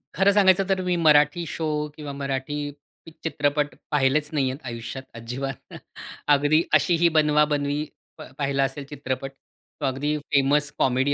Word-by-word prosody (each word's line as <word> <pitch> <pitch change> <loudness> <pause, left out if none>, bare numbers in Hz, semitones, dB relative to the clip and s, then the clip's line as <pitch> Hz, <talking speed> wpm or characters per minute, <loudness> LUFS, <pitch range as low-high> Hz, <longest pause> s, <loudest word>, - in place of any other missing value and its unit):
खरं 195 +3 +4
सांगायचं 195 -1 +5
तर 190 -1 +1
मी 180 -1 0
मराठी 155 0 +4
शो 160 +1 -3 0.3
किंवा 150 -2 -7
मराठी 140 +1 -3 0.7
चित्रपट 145 -2 0 0.2
पाहिलेच 145 +1 +2
नाहीयेत 135 -3 0
आयुष्यात 115 +2 -6
अजिबात. 125 +4 -6 0.5
अगदी 145 +2 +4
अशी 175 - +4
ही 170 +1 +4
बनवाबनवी 150 -2 +2 0.3
प - - -11 0.2
पाहिला 140 -1 0
असेल 135 +2 -3
चित्रपट. 135 -2 -5
तो 135 +2 -12
अगदी 140 +3 -1
फेमस 145 0 +1
कॉमेडी 130 +2 +2
145 Hz, 135 wpm, -24 LUFS, 135-150 Hz, 0.7 s, सांगायचं